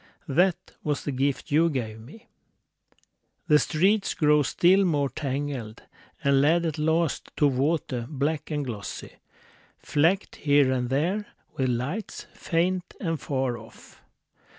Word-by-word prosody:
That 175 Hz, +5 st, +3 dB, 0.3 s
was 145 Hz, -2 st, -1 dB
the 145 Hz, -, -2 dB
gift 135 Hz, +2 st, -1 dB
you 165 Hz, +3 st, +4 dB
gave 115 Hz, -7 st, -4 dB
me.... 155 Hz, -, -14 dB, 1.2 s
The 150 Hz, -2 st, +6 dB
streets 195 Hz, +8 st, +1 dB
grew 150 Hz, -1 st, +4 dB
still 180 Hz, +8 st, +4 dB
more 145 Hz, -6 st, +1 dB
tangled, 135 Hz, -4 st, -4 dB, 0.4 s
And 140 Hz, -1 st, +4 dB
led 165 Hz, +4 st, +3 dB
at 160 Hz, -2 st, -2 dB
last 160 Hz, 0 st, 0 dB
to 150 Hz, -, +4 dB
water 135 Hz, -3 st, 0 dB
black 150 Hz, +1 st, -2 dB
and 150 Hz, -2 st, -2 dB
glossy, 110 Hz, -5 st, -7 dB, 0.6 s
Flecked 170 Hz, +7 st, +1 dB
here 145 Hz, -2 st, +3 dB
and 125 Hz, -2 st, -1 dB
there 175 Hz, +10 st, 0 dB, 0.3 s
with 130 Hz, -1 st, 0 dB
lights, 140 Hz, -, -3 dB
faint 180 Hz, +2 st, -1 dB
and 165 Hz, -4 st, -2 dB
far 130 Hz, -4 st, -1 dB
off. 115 Hz, +1 st, -16 dB
145 Hz, 130 wpm, -26 LUFS, 130-165 Hz, 1.2 s, The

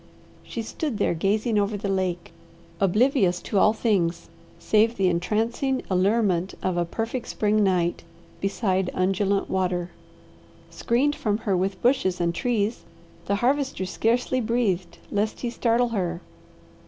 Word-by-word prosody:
She 230 Hz, -, -6 dB
stood 270 Hz, +1 st, -3 dB
there -, -, +1 dB
gazing 210 Hz, +6 st, +1 dB
over 205 Hz, +1 st, 0 dB
the 200 Hz, -, -4 dB
lake, 185 Hz, -3 st, -2 dB, 0.5 s
oblivious 200 Hz, -, +3 dB
to 200 Hz, -, 0 dB
all 210 Hz, -, +5 dB
things 200 Hz, -7 st, 0 dB, 0.3 s
save 220 Hz, +2 st, +2 dB
the 195 Hz, -1 st, +2 dB
entrancing 225 Hz, +9 st, 0 dB
allurement 190 Hz, -1 st, +1 dB
of 185 Hz, -1 st, 0 dB
a 175 Hz, 0 st, +1 dB
perfect 225 Hz, +7 st, -4 dB
spring 210 Hz, 0 st, +1 dB
night 180 Hz, -3 st, +1 dB, 0.4 s
beside 190 Hz, -2 st, 0 dB
undulant 195 Hz, +2 st, +1 dB
water. 180 Hz, -2 st, -1 dB, 0.8 s
Screened 275 Hz, +5 st, +1 dB
from 210 Hz, -2 st, 0 dB
her 200 Hz, -3 st, +2 dB
with 190 Hz, +1 st, -2 dB
bushes 235 Hz, -8 st, +2 dB
and 170 Hz, -1 st, +1 dB
trees 225 Hz, +1 st, -1 dB, 0.4 s
the 200 Hz, -, +2 dB
Harvester 270 Hz, -7 st, 0 dB
scarcely 240 Hz, +6 st, 0 dB
breathed 215 Hz, -7 st, -1 dB
lest 210 Hz, +1 st, -1 dB
he 240 Hz, -, -2 dB
startle 240 Hz, 0 st, +1 dB
her. 180 Hz, -6 st, -2 dB
205 Hz, 135 wpm, -25 LUFS, 185-230 Hz, 0.8 s, all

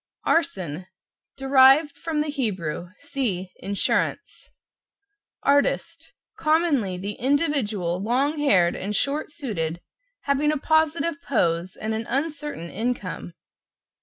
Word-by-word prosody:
=ARSON= 185 Hz, -, 0 dB, 0.5 s
Derived 270 Hz, +2 st, +5 dB
from 310 Hz, 0 st, -2 dB
the 300 Hz, -, -2 dB
Hebrew. 185 Hz, -, -3 dB
(See 220 Hz, -11 st, -3 dB
=INSURANCE=). 200 Hz, +1 st, -1 dB, 0.9 s
=ARTIST= 285 Hz, 0 st, +1 dB, 0.3 s
Commonly, 305 Hz, -, +2 dB
the 200 Hz, +3 st, -5 dB
individual 235 Hz, -, 0 dB
long 270 Hz, +8 st, +1 dB
haired 185 Hz, -12 st, +4 dB
and 205 Hz, +2 st, -3 dB
short 285 Hz, +7 st, -1 dB
suited, 180 Hz, -, -3 dB, 0.4 s
having 285 Hz, +2 st, +1 dB
a 305 Hz, -, 0 dB
positive 315 Hz, 0 st, +1 dB
pose 175 Hz, -7 st, 0 dB
and 220 Hz, +1 st, -3 dB
an 220 Hz, 0 st, -3 dB
uncertain 285 Hz, -, -3 dB
income. 215 Hz, -6 st, -3 dB
265 Hz, 105 wpm, -24 LUFS, 190-295 Hz, 0.9 s, Derived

